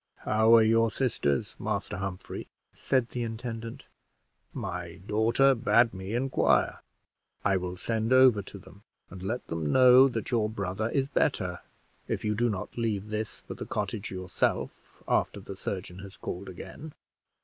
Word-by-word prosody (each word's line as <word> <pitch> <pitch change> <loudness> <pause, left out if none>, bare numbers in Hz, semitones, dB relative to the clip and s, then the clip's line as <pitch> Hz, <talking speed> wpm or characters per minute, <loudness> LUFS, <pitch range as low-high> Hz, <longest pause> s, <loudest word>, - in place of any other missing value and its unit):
How 110 +1 +5
are 115 - +7
your 115 +1 +4
sisters, 105 - -1
Master - - -3
Humphrey?" 95 -1 -5 0.3
said 130 -3 0
the 125 - -4
intendant; 115 0 -5 0.7
"my 90 -2 -5
daughter 115 +6 +3
bade 115 -1 +3
me 95 +3 -5
inquire. 130 +2 +2 0.7
I 100 -1 +3
will 90 0 -4
send 110 +3 -1
over 130 -5 +6
to 95 - -11
them - - -15 0.3
and 95 0 -9
let 110 +6 -3
them 80 -3 -2
know 130 +1 +8
that 115 -4 -4
your 110 -3 +2
brother 100 +1 -2
is 135 +1 0
better, - - 0 0.5
if - - -3
you 105 - +1
do 120 +3 +1
not 105 -1 -4
leave 105 -3 -1
this 110 0 -4
for - - -8
the - - -7
cottage 105 -2 -3
yourself 95 -1 -1 0.4
after - - +1
the 100 0 -8
surgeon 95 -1 -5
has 95 0 -10
called 95 +2 -6
again." 95 - -9
110 Hz, 155 wpm, -28 LUFS, 95-115 Hz, 0.7 s, know